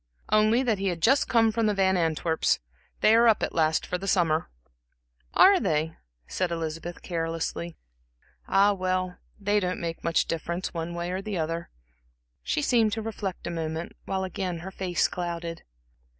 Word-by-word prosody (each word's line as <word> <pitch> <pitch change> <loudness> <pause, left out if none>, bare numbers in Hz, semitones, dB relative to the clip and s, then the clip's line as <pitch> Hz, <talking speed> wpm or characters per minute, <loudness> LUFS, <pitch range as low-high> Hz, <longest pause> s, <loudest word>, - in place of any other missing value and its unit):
"Only 215 +4 +4
that 225 -6 +1
he 195 - -1
had 175 -3 -1
just 265 - +3
come 225 -2 +4
from 225 0 +1
the 210 - +1
Van 190 -1 +3
Antwerps' 160 -1 +1 0.4
they 215 - +6
are 230 +1 +6
up 220 - +4
at - - -1
last 160 -1 +2
for 180 - -3
the 195 - -6
summer." 165 -5 +2 0.9
"Are 390 -1 +7
they," 155 - 0 0.3
said 185 -1 -1
Elizabeth, 165 +1 -4
carelessly. 165 0 -3 0.7
"Ah, 200 +1 +4
well, 185 -1 -2 0.2
they 205 +1 +2
don't 180 -2 -2
make 165 -1 -5
much 165 0 +2
difference, 170 +2 -3
one 170 0 -4
way 175 +1 -3
or 185 +1 -2
the 205 -2 -4
other." 165 +1 -3 0.7
She 300 - -1
seemed 230 -6 +3
to 225 - -2
reflect 205 -4 -5
a 175 - -3
moment, 160 0 -4
while 190 -1 -2
again 185 -1 -3
her 190 - -6
face 185 -2 0
clouded. 170 -1 -4
180 Hz, 170 wpm, -27 LUFS, 165-205 Hz, 0.9 s, Are